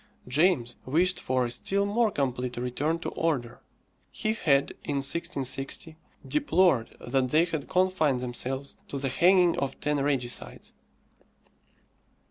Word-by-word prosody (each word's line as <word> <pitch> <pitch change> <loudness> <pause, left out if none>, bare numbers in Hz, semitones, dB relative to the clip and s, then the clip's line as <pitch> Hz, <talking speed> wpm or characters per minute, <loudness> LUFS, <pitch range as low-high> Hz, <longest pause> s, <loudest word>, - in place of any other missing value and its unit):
James 130 -3 +2
wished 175 +7 +1
for 130 -1 0
a 120 - -3
still 200 +10 0
more 220 +3 +2
complete 125 -7 -2
return 130 +7 -1
to 165 - -4
order. 145 -8 -2 0.5
He 215 - -1
had, 140 -10 +2
in 145 - -2
1660, 140 0 -3 0.3
deplored 185 - +2
that 130 +1 0
they 155 +5 +4
had 160 -5 -4
confined 180 -8 +2
themselves 130 +2 -4
to 140 - -5
the 135 0 -1
hanging 180 +4 +4
of 135 -1 -3
ten 150 0 0
regicides. 135 -4 -2
140 Hz, 125 wpm, -28 LUFS, 130-175 Hz, 0.5 s, they